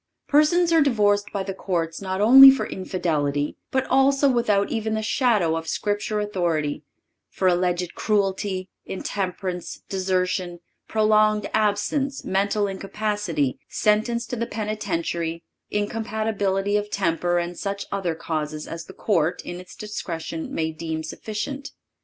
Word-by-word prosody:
Persons 330 Hz, +4 st, +4 dB
are 325 Hz, -, +6 dB
divorced 205 Hz, -7 st, +3 dB
by 200 Hz, -, -2 dB
the 195 Hz, 0 st, -4 dB
courts 170 Hz, -3 st, -2 dB
not 190 Hz, 0 st, -2 dB
only 265 Hz, +5 st, +11 dB
for 270 Hz, -, +2 dB
infidelity, 150 Hz, -6 st, -1 dB
but 265 Hz, 0 st, 0 dB
also 275 Hz, +2 st, +4 dB
without 210 Hz, -5 st, +1 dB
even 220 Hz, -1 st, -1 dB
the 220 Hz, -, -2 dB
shadow 215 Hz, -, +2 dB
of 165 Hz, 0 st, -4 dB
Scripture 205 Hz, +3 st, -1 dB
authority—for 170 Hz, -3 st, -3 dB
alleged 180 Hz, -1 st, +1 dB
cruelty, 195 Hz, -2 st, 0 dB, 0.2 s
intemperance, 185 Hz, -2 st, -4 dB
desertion, 185 Hz, -2 st, -1 dB, 0.3 s
prolonged 215 Hz, -1 st, +3 dB
absence, 220 Hz, +7 st, 0 dB
mental 200 Hz, +2 st, +1 dB
incapacity, 195 Hz, -6 st, -2 dB
sentence 220 Hz, +3 st, +1 dB
to 245 Hz, -, -4 dB
the 235 Hz, 0 st, -2 dB
penitentiary, 170 Hz, -6 st, -3 dB, 0.3 s
incompatibility 210 Hz, -2 st, -1 dB
of 210 Hz, 0 st, -3 dB
temper 175 Hz, -2 st, 0 dB
and 175 Hz, 0 st, -3 dB
such 200 Hz, 0 st, -3 dB
other 185 Hz, -4 st, -1 dB
causes 155 Hz, -2 st, -4 dB
as 165 Hz, 0 st, -6 dB
the 190 Hz, -, -12 dB
court, 175 Hz, -6 st, 0 dB
in 175 Hz, 0 st, -6 dB
its 180 Hz, 0 st, -12 dB
discretion, 165 Hz, -6 st, -5 dB
may 160 Hz, 0 st, -1 dB
deem 160 Hz, 0 st, -4 dB
sufficient. 225 Hz, -, -5 dB
200 Hz, 130 wpm, -24 LUFS, 175-215 Hz, 0.3 s, only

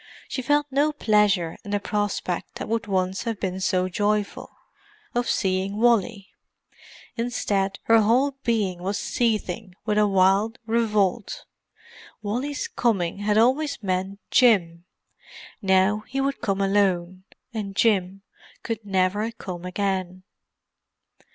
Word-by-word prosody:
She 260 Hz, -, -3 dB
felt 290 Hz, +3 st, +2 dB
no 290 Hz, +3 st, +2 dB
pleasure 210 Hz, -, +2 dB
in 205 Hz, -, -9 dB
the 205 Hz, 0 st, 0 dB
prospect 205 Hz, -3 st, -2 dB
that -, -, -5 dB
would 225 Hz, -1 st, -2 dB
once 190 Hz, -1 st, 0 dB
have 225 Hz, -4 st, -3 dB
been 190 Hz, -1 st, -3 dB
so 185 Hz, -1 st, +1 dB
joyful, 205 Hz, +2 st, -1 dB, 0.6 s
of 245 Hz, 0 st, 0 dB
seeing 190 Hz, 0 st, 0 dB
Wally. 225 Hz, -3 st, +2 dB, 0.9 s
Instead 205 Hz, -5 st, -1 dB
her 225 Hz, 0 st, +5 dB
whole 250 Hz, +7 st, +3 dB
being 205 Hz, -7 st, 0 dB
was 195 Hz, +3 st, -2 dB
seething 215 Hz, -4 st, -1 dB
with 210 Hz, -1 st, +1 dB
a 210 Hz, -, +4 dB
wild 195 Hz, +3 st, +3 dB
revolt. 220 Hz, -2 st, 0 dB, 0.8 s
Wally's 255 Hz, +8 st, -2 dB
coming 195 Hz, -6 st, 0 dB
had 210 Hz, +1 st, +1 dB
always 260 Hz, +2 st, +2 dB
meant 190 Hz, +1 st, -2 dB
Jim. 180 Hz, -9 st, +3 dB, 0.8 s
Now 190 Hz, +1 st, +3 dB
he 270 Hz, -, -3 dB
would 275 Hz, +1 st, -1 dB
come 200 Hz, -3 st, -1 dB
alone, 185 Hz, -2 st, +1 dB, 0.3 s
and 200 Hz, -3 st, -4 dB
Jim 195 Hz, -3 st, +1 dB, 0.4 s
could 225 Hz, -2 st, -4 dB
never 195 Hz, +2 st, 0 dB
come 180 Hz, -6 st, -8 dB
again. 185 Hz, -1 st, -2 dB
205 Hz, 125 wpm, -24 LUFS, 190-230 Hz, 0.9 s, her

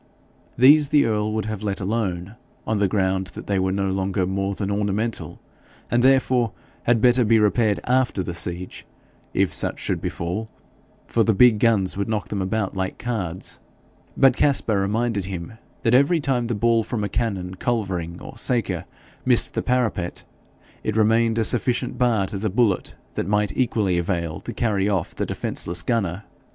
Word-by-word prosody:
These 140 Hz, +4 st, +6 dB
the 145 Hz, -1 st, +4 dB
earl 105 Hz, -1 st, 0 dB
would 110 Hz, -1 st, -1 dB
have 110 Hz, -2 st, -4 dB
let 100 Hz, -2 st, -2 dB
alone, 100 Hz, -2 st, -2 dB, 0.3 s
on 110 Hz, -2 st, 0 dB
the 100 Hz, -, +3 dB
ground 95 Hz, -1 st, 0 dB
that -, -, -8 dB
they 100 Hz, -2 st, 0 dB
were 95 Hz, 0 st, +1 dB
no 95 Hz, 0 st, 0 dB
longer 95 Hz, 0 st, 0 dB
more 95 Hz, +1 st, -2 dB
than 100 Hz, 0 st, -3 dB
ornamental, 105 Hz, +2 st, -2 dB, 0.5 s
and 120 Hz, -, +3 dB
therefore 130 Hz, -3 st, +3 dB, 0.3 s
had 120 Hz, -2 st, +3 dB
better 125 Hz, +1 st, +5 dB
be 115 Hz, 0 st, +4 dB
repaired 105 Hz, -2 st, +2 dB
AFTER 125 Hz, -6 st, +1 dB
the 90 Hz, -, -4 dB
siege, 85 Hz, +2 st, -5 dB, 0.5 s
if -, -, +2 dB
such -, -, 0 dB
should -, -, -3 dB
befall, 90 Hz, +7 st, -3 dB, 0.6 s
for 115 Hz, -, +1 dB
the 110 Hz, -1 st, +2 dB
big 115 Hz, 0 st, +6 dB
guns 105 Hz, -5 st, +2 dB
would 100 Hz, +2 st, -2 dB
knock 105 Hz, -2 st, -2 dB
them 100 Hz, -2 st, -2 dB
about 100 Hz, +1 st, -2 dB
like 95 Hz, 0 st, -3 dB
cards; 95 Hz, -8 st, -3 dB, 0.6 s
but 135 Hz, -2 st, +5 dB
Caspar 125 Hz, -8 st, +2 dB
reminded 105 Hz, 0 st, 0 dB
him 90 Hz, -1 st, -6 dB, 0.3 s
that 115 Hz, -, +2 dB
every 140 Hz, +7 st, +4 dB
time 130 Hz, -5 st, 0 dB
the 120 Hz, -, -1 dB
ball 115 Hz, +2 st, +3 dB
from 110 Hz, -1 st, -3 dB
a -, -, 0 dB
cannon, 100 Hz, -4 st, -2 dB
culvering, 95 Hz, -6 st, -2 dB
or -, -, -10 dB
saker 120 Hz, -5 st, -1 dB, 0.4 s
missed -, -, +4 dB
the -, -, -1 dB
parapet, 115 Hz, -8 st, -1 dB, 0.6 s
it 110 Hz, 0 st, -1 dB
remained 115 Hz, +1 st, +3 dB
a 115 Hz, -, +2 dB
sufficient 125 Hz, +1 st, 0 dB
bar 115 Hz, -6 st, +2 dB
to 100 Hz, +1 st, -4 dB
the 110 Hz, +1 st, -1 dB
bullet 105 Hz, -1 st, +1 dB, 0.2 s
that -, -, -3 dB
might 105 Hz, 0 st, 0 dB
equally 105 Hz, -8 st, +1 dB
avail 85 Hz, -3 st, -2 dB
to -, -, -7 dB
carry 105 Hz, -3 st, 0 dB
off 95 Hz, -5 st, -1 dB
the -, -, -3 dB
defenceless 85 Hz, -1 st, -1 dB
gunner. 100 Hz, -4 st, -1 dB
105 Hz, 175 wpm, -23 LUFS, 95-115 Hz, 0.6 s, These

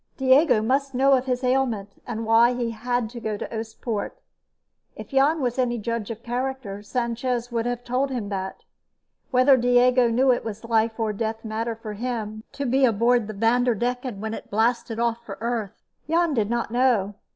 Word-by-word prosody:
Diego 265 Hz, -3 st, +4 dB
must 270 Hz, +3 st, 0 dB
know 270 Hz, +2 st, +4 dB
of 260 Hz, -1 st, +2 dB
his 250 Hz, 0 st, -1 dB
ailment, 245 Hz, -6 st, -1 dB
and 225 Hz, -2 st, -4 dB
why 230 Hz, +2 st, +5 dB
he 240 Hz, -2 st, -2 dB
had 245 Hz, +1 st, -1 dB
to 240 Hz, -, -7 dB
go 215 Hz, -2 st, -3 dB
to -, -, -5 dB
Oostpoort. 220 Hz, -1 st, -4 dB, 0.8 s
If -, -, -9 dB
Jan 285 Hz, +3 st, +3 dB
was 245 Hz, 0 st, -1 dB
any 240 Hz, -1 st, +1 dB
judge 230 Hz, -1 st, -3 dB
of 230 Hz, 0 st, -7 dB
character, 245 Hz, -4 st, -3 dB
Sanchez 240 Hz, +2 st, -2 dB
would 230 Hz, 0 st, -1 dB
have 245 Hz, 0 st, -3 dB
told 255 Hz, +3 st, 0 dB
him 240 Hz, -6 st, -3 dB
that. 190 Hz, -1 st, -5 dB, 0.7 s
Whether 255 Hz, +1 st, +5 dB
Diego 245 Hz, 0 st, +4 dB
knew 255 Hz, +3 st, +3 dB
it 245 Hz, -, 0 dB
was 220 Hz, -1 st, -6 dB
a -, -, -8 dB
life 225 Hz, 0 st, +1 dB
or 220 Hz, -1 st, 0 dB
death 220 Hz, +1 st, -3 dB
matter 225 Hz, +1 st, -2 dB
for 220 Hz, -1 st, -7 dB
him 220 Hz, -1 st, -4 dB
to 280 Hz, -, -4 dB
be 265 Hz, +2 st, +2 dB
aboard 235 Hz, -1 st, +3 dB
the 215 Hz, -, -5 dB
Vanderdecken 245 Hz, +1 st, 0 dB
when 220 Hz, +1 st, -4 dB
it -, -, -8 dB
blasted 230 Hz, +1 st, 0 dB
off 235 Hz, 0 st, 0 dB
for 200 Hz, -4 st, -8 dB
Earth, 230 Hz, -3 st, -3 dB, 0.3 s
Jan 335 Hz, -1 st, +2 dB
did 220 Hz, -5 st, 0 dB
not 235 Hz, -1 st, -1 dB
know. 240 Hz, -5 st, +2 dB
235 Hz, 185 wpm, -24 LUFS, 220-250 Hz, 0.8 s, why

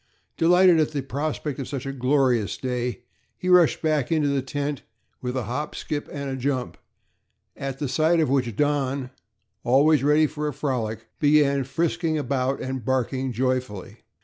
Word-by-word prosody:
Delighted 180 Hz, 0 st, +5 dB
at 155 Hz, 0 st, +1 dB
the 140 Hz, -2 st, -2 dB
prospect 145 Hz, +1 st, -3 dB
of 135 Hz, -, -4 dB
such 135 Hz, -2 st, -5 dB
a 135 Hz, -, -4 dB
glorious 125 Hz, -6 st, +1 dB
day, 125 Hz, -1 st, -3 dB, 0.3 s
he 180 Hz, -, -3 dB
rushed 180 Hz, -3 st, +5 dB
back 155 Hz, -4 st, +1 dB
into 155 Hz, -3 st, +2 dB
the 140 Hz, -1 st, +1 dB
tent 140 Hz, +1 st, -3 dB, 0.4 s
with 125 Hz, +1 st, -3 dB
a 125 Hz, -, -1 dB
hop, 125 Hz, +7 st, -4 dB
skip 145 Hz, -1 st, -4 dB
and 140 Hz, -1 st, -5 dB
a 135 Hz, -, -3 dB
jump, 130 Hz, -1 st, -2 dB, 0.8 s
at 135 Hz, -1 st, -5 dB
sight 160 Hz, +6 st, +2 dB
of 160 Hz, -, +3 dB
which 125 Hz, -4 st, 0 dB
Don, 140 Hz, -2 st, 0 dB, 0.5 s
always 140 Hz, +3 st, +4 dB
ready 150 Hz, +2 st, +4 dB
for 150 Hz, 0 st, -3 dB
a 150 Hz, -, -3 dB
frolic, 115 Hz, -6 st, -3 dB
began 145 Hz, -2 st, +3 dB
frisking 165 Hz, +3 st, -1 dB
about 135 Hz, -2 st, -1 dB
and 130 Hz, -2 st, -4 dB
barking 130 Hz, +1 st, -1 dB
joyfully. 125 Hz, -5 st, -2 dB
140 Hz, 160 wpm, -24 LUFS, 130-150 Hz, 0.8 s, Delighted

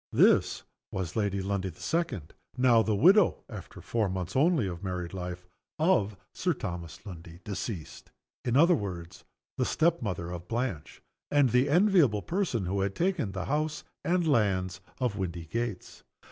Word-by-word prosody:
This -, -, +4 dB, 0.3 s
was 90 Hz, -4 st, -4 dB
Lady 100 Hz, -3 st, 0 dB
Lundie 95 Hz, -1 st, -1 dB
the 85 Hz, -, -13 dB
Second, 160 Hz, -, -2 dB, 0.2 s
now 125 Hz, -3 st, +5 dB
the 110 Hz, -1 st, +1 dB
widow 185 Hz, -, +5 dB
(after -, -, -9 dB
four 110 Hz, -4 st, 0 dB
months 90 Hz, -2 st, -4 dB
only 150 Hz, -, +3 dB
of 90 Hz, -1 st, -5 dB
married 90 Hz, -2 st, -4 dB
life) 90 Hz, -1 st, -5 dB, 0.3 s
of 115 Hz, -, +2 dB, 0.2 s
Sir 180 Hz, -1 st, 0 dB
Thomas 85 Hz, -4 st, -6 dB
Lundie, 85 Hz, -3 st, -10 dB
deceased. 100 Hz, -5 st, -6 dB, 0.3 s
In 120 Hz, +1 st, +1 dB
other 170 Hz, +4 st, +6 dB
words, 90 Hz, -, -4 dB, 0.4 s
the -, -, +3 dB
step 170 Hz, 0 st, +2 dB
mother 90 Hz, -6 st, -3 dB
of 90 Hz, 0 st, -7 dB
Blanche, 115 Hz, -, -3 dB, 0.3 s
and 145 Hz, -4 st, +4 dB
the 125 Hz, +3 st, +3 dB
enviable 170 Hz, -, +4 dB
person 170 Hz, -, -1 dB
who 95 Hz, +2 st, -1 dB
had 100 Hz, 0 st, -1 dB
taken 175 Hz, -, 0 dB
the 95 Hz, -1 st, -3 dB
house 150 Hz, +2 st, -1 dB, 0.2 s
and 175 Hz, -1 st, +1 dB
lands 95 Hz, -8 st, +1 dB, 0.2 s
of 120 Hz, -6 st, 0 dB
Windygates. 95 Hz, +4 st, -4 dB
105 Hz, 155 wpm, -29 LUFS, 90-145 Hz, 0.4 s, other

